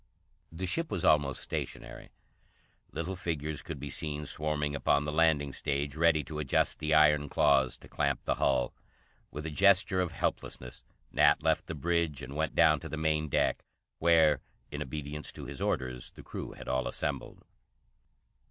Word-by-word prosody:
The 85 +3 -4
ship 165 - -1
was 85 - -2
almost 70 -3 +3
stationary. 60 -1 -5 0.8
Little 90 +3 -3
figures 80 -4 -3
could 80 -4 -7
be 70 0 -5
seen 75 +1 -2
swarming 75 0 -2
upon 70 0 +2
the 75 - -2
landing 75 -3 +2
stage, 70 +1 -2
ready 80 -1 +3
to 75 +3 -6
adjust 75 -4 +1
the 80 0 +1
iron 75 -1 +5
claws 70 -3 +3
to - - -15
clamp - - -1
the - - +2
hull. 65 -3 +2 0.6
With 75 +2 -7
a 80 - -3
gesture 95 +2 +4
of 90 - -2
helplessness, 60 -1 -4 0.3
Nat - - +4
left - - +1
the 80 - -4
bridge 80 -2 0
and 65 +3 -7
went 80 +1 -1
down 75 -1 +5
to - - -8
the 75 - -4
main 80 0 0
deck - - +1 0.4
where, 80 -4 +4 0.3
in - - -5
obedience 75 +2 -5
to 75 - -8
his 70 0 -7
orders, 65 -1 -2
the - - -14
crew - - -7
had - - -11
all 65 0 0
assembled. - - -4
75 Hz, 170 wpm, -30 LUFS, 70-80 Hz, 0.8 s, iron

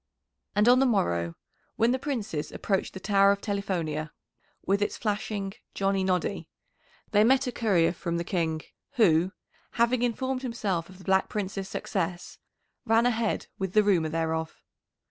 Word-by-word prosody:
And 210 +2 +4
on 250 +1 +7
the 270 - +4
morrow 85 - 0 0.4
when 230 +2 +3
the 260 - 0
Princes 220 - -3
approached 195 -1 -2
the - - -5
Tower 200 0 +4
of 200 - 0
Telifonia, 170 -7 -2 0.6
with 200 +1 +1
its 205 - -1
flashing 205 -2 -2 0.2
"Johnny 195 -1 +1
Noddy," 185 -1 -1 0.6
they 210 -1 +5
met 265 +4 +4
a 250 - -2
courier 190 -9 +2
from 170 -1 -3
the 170 - -1
King, 165 -3 -1 0.3
who, 180 -5 +4 0.4
having 235 +1 +2
informed 255 +2 -1
himself 205 -9 -2
of 185 - -13
the 190 - -14
Black 190 0 +2
Prince's 195 -1 -3
success, 180 -2 -3 0.4
ran 225 0 +3
ahead 230 -2 0
with 190 -1 -3
the 215 - +5
rumour 180 -6 +2
thereof. 160 0 -2
195 Hz, 155 wpm, -27 LUFS, 170-225 Hz, 0.6 s, on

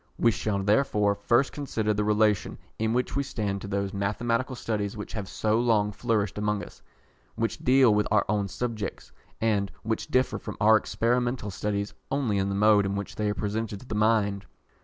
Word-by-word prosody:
We 115 - +4
shall 100 0 -2
therefore 105 -1 +2
first 120 +6 +2
consider 110 -7 -1
the 105 0 0
relation 105 -1 +2 0.2
in 110 0 +1
which 125 +1 -1
we 140 - +2
stand 105 -7 -3
to - - -6
those 100 -1 -2
mathematical 115 +6 -1
studies 105 -3 -3
which 105 - -7
have 100 -3 -5
so 110 +1 +1
long 110 -4 +2
flourished 105 -3 -1
among 105 0 -1
us, - - -12 0.5
which 115 0 -2
deal 130 -3 +5
with 105 0 +2
our 105 -1 +3
own 105 -1 0
subjects, 105 +1 -4 0.3
and 105 -3 +1
which 110 0 -2
differ 130 0 +1
from 105 - -7
our 110 +2 +6
experimental 120 0 0
studies 100 +1 -2 0.2
only 125 -8 0
in 95 0 0
the 100 - -2
mode 105 -1 +4
in 100 - -2
which 100 0 -5
they 105 -1 -1
are 105 - -1
presented 105 0 -3
to - - -13
the 110 - -5
mind. 105 -2 +1
105 Hz, 190 wpm, -27 LUFS, 100-115 Hz, 0.5 s, our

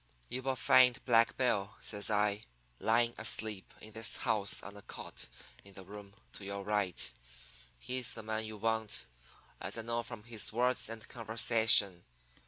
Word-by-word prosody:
You 125 +2 -2
will 135 0 -1
find 125 +3 +4
Black 115 -2 +3
Bill,' 105 -6 0
says 105 -1 0
I, 105 0 +1 0.4
'lying 115 +1 +2
asleep 105 -3 -1
in 110 - -10
this 110 0 +2
house 100 -2 0
on 100 - -10
a 100 - -10
cot - - -9 0.4
in 100 -1 -16
the 95 - -10
room 100 0 -11 0.2
to - - -9
your 100 0 -5
right. 100 -9 -1 0.7
He's 125 - -1
the 110 - -8
man 110 0 -3
you 110 0 -7
want, 110 0 -1 0.6
as - - -3
I 115 - -4
know 115 +1 -1
from 115 -2 -9
his 115 -2 -2
words 125 +1 +1
and 115 -1 -8
conversation. 110 -5 +4
110 Hz, 165 wpm, -33 LUFS, 100-115 Hz, 0.7 s, find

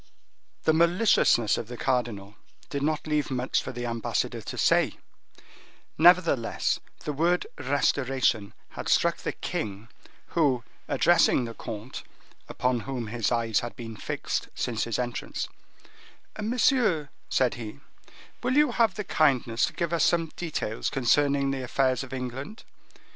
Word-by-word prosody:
The 160 - +4
maliciousness 170 - +4
of 110 - -6
the 120 0 -8
cardinal 115 -7 -1 0.4
did 140 - -2
not 155 +1 0
leave 150 -1 0
much 130 -1 0
for - - -6
the 120 -1 -5
ambassador 115 -1 -2
to - - -7
say; - - +3 1.0
nevertheless, 165 -7 +4 0.2
the 150 - -3
word 170 +5 +1
"restoration" 130 -6 +1
had - - -6
struck - - +3
the - - -3
king, 105 +1 -5 0.4
who, 135 -8 +2 0.2
addressing 170 -7 +4
the 115 - -6
comte, 115 +2 -7 0.5
upon 125 -1 0
whom 115 0 -5
his 115 -2 -1
eyes 115 -3 +1
had 120 - -6
been 115 -2 -7
fixed - - -3
since 115 -3 -1
his 115 -3 -2
entrance,—"Monsieur," 210 - -2 0.2
said 130 -2 +2
he, 110 -10 -8 0.6
"will 250 +2 0
you 295 -3 +5
have 225 -4 +2
the 210 - -3
kindness 130 - +2
to - - -7
give 170 -1 -2
us 170 - +2
some 165 -2 +2
details 155 -10 -3
concerning 140 +1 +2
the 135 -1 -3
affairs 130 0 +1
of 135 - -10
England. 130 - -6
130 Hz, 135 wpm, -27 LUFS, 115-160 Hz, 1.0 s, you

